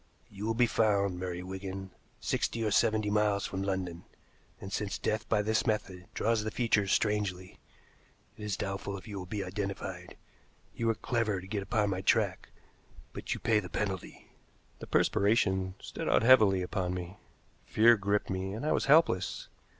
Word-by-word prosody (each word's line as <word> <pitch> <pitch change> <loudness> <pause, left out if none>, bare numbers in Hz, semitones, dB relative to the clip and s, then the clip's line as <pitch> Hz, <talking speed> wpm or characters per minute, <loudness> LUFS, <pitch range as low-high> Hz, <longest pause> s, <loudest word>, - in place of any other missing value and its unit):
You 105 +1 -5
will 115 - 0
be 120 +1 +4
found, 100 -5 +1
Murray 90 -1 -4
Wigan, 95 0 -6 0.3
sixty 115 - -1
or 105 - 0
seventy 110 -1 +2
miles 105 -1 +2
from 95 - -4
London, 95 -3 -3 0.6
and 95 0 -8
since 105 -2 -2
death 110 -1 -2
by 105 -2 +2
this 110 +1 +1
method 95 -4 -2
draws 115 -1 +1
the 110 - -2
features 105 -4 +1
strangely, 100 -4 -1 0.8
it 105 - -10
is 105 -2 -2
doubtful 100 0 -4
if 95 - -12
you 100 -2 -5
will 90 - -7
be 100 +1 -3
identified. 100 +1 -5 0.6
You 115 - -2
were 115 - +2
clever 110 -3 -1
to 90 - -10
get 100 +1 -3
upon 105 0 0
my 95 0 -2
track, - - +1 0.6
but - - -3
you - - -7
pay 115 -2 +2
the 90 -4 -7
penalty." 95 -3 -4 0.5
The - - -8
perspiration 95 -3 +2
stood - - -5
out - - +3
heavily 110 -7 +6
upon 90 0 -2
me. 90 +2 -6 0.5
Fear 115 +2 +6
gripped 100 0 0
me, 95 +1 -3
and 115 +7 -5
I 155 - +1
was - - +1
helpless. 140 - +3
100 Hz, 175 wpm, -30 LUFS, 95-110 Hz, 0.8 s, heavily